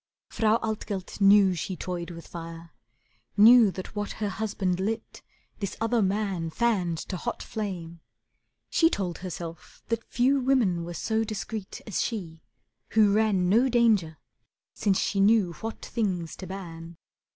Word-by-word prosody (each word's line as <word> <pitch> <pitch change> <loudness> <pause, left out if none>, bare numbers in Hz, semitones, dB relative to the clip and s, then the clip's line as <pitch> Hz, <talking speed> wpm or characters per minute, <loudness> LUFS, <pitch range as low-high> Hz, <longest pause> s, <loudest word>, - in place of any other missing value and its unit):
Frau 220 0 +2
Altgelt 210 -3 -4
knew 195 -1 +6
she 180 +2 -4
toyed 175 -1 -5
with 170 -1 -9
fire, 165 0 -9 0.7
knew 225 +1 +8
That 185 +2 -7
what 205 0 -3
her 210 -2 -2
husband 195 -3 -2
lit 215 +4 -3 0.4
this 200 -3 -4
other 225 +1 +1
man 195 -4 0
Fanned 185 -4 0
to 185 - -2
hot 235 +7 -4
flame. 180 -6 -5 0.7
She 330 - +4
told 185 - -3
herself 170 -2 -8
that 230 -1 -1
few 265 +3 +2
Women 245 -10 +2
were 170 0 -6
so 220 +6 0
discreet 215 -1 -5
as 215 - -1
she, 170 -8 -4 0.5
who 210 -2 +5
ran 205 -4 +2
No 235 +8 +4
danger 215 -10 +3 0.6
since 200 -3 +1
she 200 - 0
knew 200 -3 +4
what 225 0 -5
things 185 -8 -2
to 185 - -7
ban. 170 -3 -8
200 Hz, 145 wpm, -27 LUFS, 175-220 Hz, 0.7 s, knew